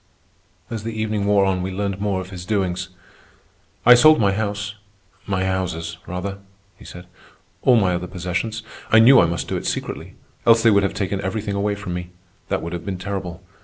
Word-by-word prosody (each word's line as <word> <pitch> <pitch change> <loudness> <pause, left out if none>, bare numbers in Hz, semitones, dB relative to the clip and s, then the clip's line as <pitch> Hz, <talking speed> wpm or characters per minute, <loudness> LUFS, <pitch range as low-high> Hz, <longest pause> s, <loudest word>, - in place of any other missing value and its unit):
As 115 -2 -3
the 110 0 -5
evening 105 -2 -1
wore 100 -1 +4
on 95 -1 0
we 95 - -3
learned 100 0 -3
more 100 -2 0
of 95 +1 -10
his 90 -2 -7
doings. 95 -2 -1 1.0
"I 125 - +10
sold 155 +6 +7
my 100 -3 +3
house—my 100 -2 -5
houses, 90 -3 -3
rather," 95 +2 -4 0.4
he - - -16
said, 90 0 -10 0.6
"all 125 - +5
my 95 -5 +3
other 90 +1 -3
possessions. 90 +5 -3 0.3
I 110 - +7
knew 125 +4 +8
I 85 - +5
must 85 -2 -3
do - - -2
it - - -4
secretly, - - -4 0.3
else 115 -1 +5
they 115 - +6
would 100 -1 +4
have 100 -1 -1
taken 100 -1 -2
everything 100 +1 -3
away 100 +1 0
from 100 -3 -6
me. 90 0 -5 0.4
That - - -1
would 85 +1 -5
have 85 -2 -5
been 95 0 -4
terrible. 95 -2 -5
100 Hz, 195 wpm, -21 LUFS, 90-105 Hz, 1.0 s, I